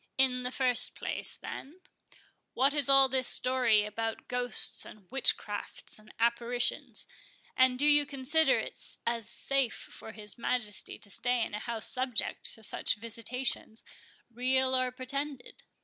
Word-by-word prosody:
"In 255 -1 +3
the 250 - -2
first 255 -2 +1
place, - - -3
then, 310 +7 -9 0.8
what 270 +3 +2
is 290 -3 +3
all 270 -1 +7
this 260 -1 +1
story 250 -5 +4
about 225 +1 -5
ghosts, 245 0 -1
and 210 -3 -13
witch 270 -1 +3
crafts, 205 +1 -7
and 215 0 -17
apparitions? 235 +1 0 0.5
and 255 -1 +3
do 285 - +2
you 295 -1 +5
consider 295 - +2
it - - -5 0.3
as 230 -2 -1
safe 275 -4 +3
for 220 - -9
his 210 0 -8
Majesty 220 -4 0
to 205 - -8
stay 245 0 0
in - - -10
a 210 - -3
house 230 -1 -2
subject 255 -2 +1
to 220 - -13
such - - +1
visitations, 230 +1 -4 0.5
real 260 +2 +2
or 255 0 +1
pretended?" 270 +2 -6
250 Hz, 150 wpm, -30 LUFS, 230-265 Hz, 0.8 s, all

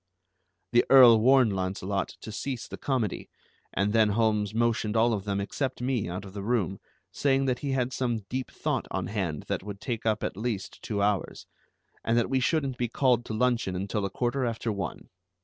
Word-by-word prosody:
The 120 -1 +5
Earl 125 -4 +9
warned 125 -2 +5
Launcelot 95 +1 -2
to 110 - -7
cease 125 +2 -4
the - - -7
comedy, 125 -7 -2 0.4
and 100 +1 0
then 110 -2 +4
Holmes 105 -1 +1
motioned 115 -1 0
all 115 +1 +4
of 100 -2 -3
them 100 -1 -1
except 130 +6 -3
me 125 -6 -1
out 95 +3 -5
of 95 - -11
the 100 - -5
room, 100 -3 0 0.3
saying 135 -1 +1
that 125 -2 0
he 140 -2 -2
had 130 -1 0
some 120 -6 -1
deep 130 +3 -3
thought - - -2
on - - -2
hand 95 -8 -3
that - - -3
would 100 0 -7
take 115 0 -3
up 110 -1 +1
at - - -2
least 110 -1 -4
two 100 -2 -2
hours, 100 -3 -1 0.6
and 115 +1 +1
that 120 +2 +1
we 135 - +3
shouldn't 135 -1 0
be 120 - +1
called 120 0 +2
to - - -5
luncheon 120 -5 +1
until 100 +3 -2
a 100 - -1
quarter 125 +6 -1
after 115 -1 -1
one. 100 -2 -5
115 Hz, 200 wpm, -28 LUFS, 100-125 Hz, 0.6 s, Earl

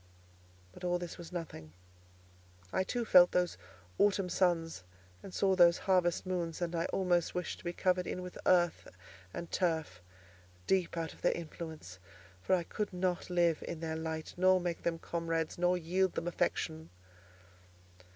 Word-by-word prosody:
But - - -13
all 175 0 +1
this 175 0 -7
was 170 0 -9
nothing; 155 - -7 1.0
I 190 - +2
too 240 +5 -2
felt 180 -4 +7
those 180 -1 +1 0.4
autumn 195 -2 +3
suns 165 - +1 0.4
and 195 - -9
saw 190 +1 +2
those 170 -2 +6
harvest 180 -2 +2
moons, 175 -3 -2
and 175 -1 -2
I 165 0 0
almost 180 -3 +1
wished 180 - -3
to - - -15
be 175 - -2
covered 180 0 +1
in 180 - -4
with 180 - -8
earth 175 -2 +3 0.4
and 170 - -7
turf, 160 - -1 0.6
deep 185 -3 +1
out 165 -1 -3
of - - -19
their - - +3
influence; 160 - -8 0.4
for 185 - +3
I 175 - -1
could 210 +4 -3
not 180 -1 -1
live 170 -3 +2
in 170 - -5
their 160 -1 -3
light, 160 0 -4
nor 185 +1 +5
make 175 -1 -3
them 170 -1 -1
comrades, 165 -1 -2
nor 180 +1 +3
yield 180 +2 +1
them - - -2
affection. 160 -2 -1
175 Hz, 160 wpm, -33 LUFS, 165-180 Hz, 1.0 s, felt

